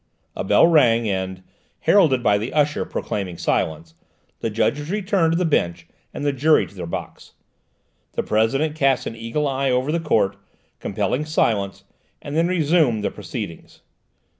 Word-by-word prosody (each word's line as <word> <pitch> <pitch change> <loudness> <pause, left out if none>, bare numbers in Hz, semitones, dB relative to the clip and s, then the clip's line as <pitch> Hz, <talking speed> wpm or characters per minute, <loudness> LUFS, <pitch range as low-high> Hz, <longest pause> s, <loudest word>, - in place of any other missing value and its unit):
A - - -3
bell 105 +10 +5
rang, 120 -9 +4
and, 95 -1 -3 0.4
heralded 150 -11 +4
by 100 -2 +3
the 110 +4 -4
usher 150 0 +1
proclaiming 95 -4 -4
silence, 80 0 -1 0.5
the 115 - -2
judges 145 +7 -1
returned 195 -4 +1
to - - +1
the 180 - +1
bench 85 - 0 0.3
and - - -5
the 145 - +1
jury 150 +4 +3
to - - -16
their 90 -3 -6
box. - - -7 0.8
The - - -1
President 135 +8 +1
cast 135 -3 +2
an 115 - -5
eagle 115 +6 -2
eye 135 0 0
over 130 +3 +1
the 170 - 0
court, 110 -11 +1 0.4
compelling 135 +4 -1
silence, 105 -10 0 0.4
and 145 - -7
then 165 +1 +3
resumed 155 - +2
the - - -1
proceedings. 85 - -8
130 Hz, 160 wpm, -22 LUFS, 100-155 Hz, 0.8 s, bell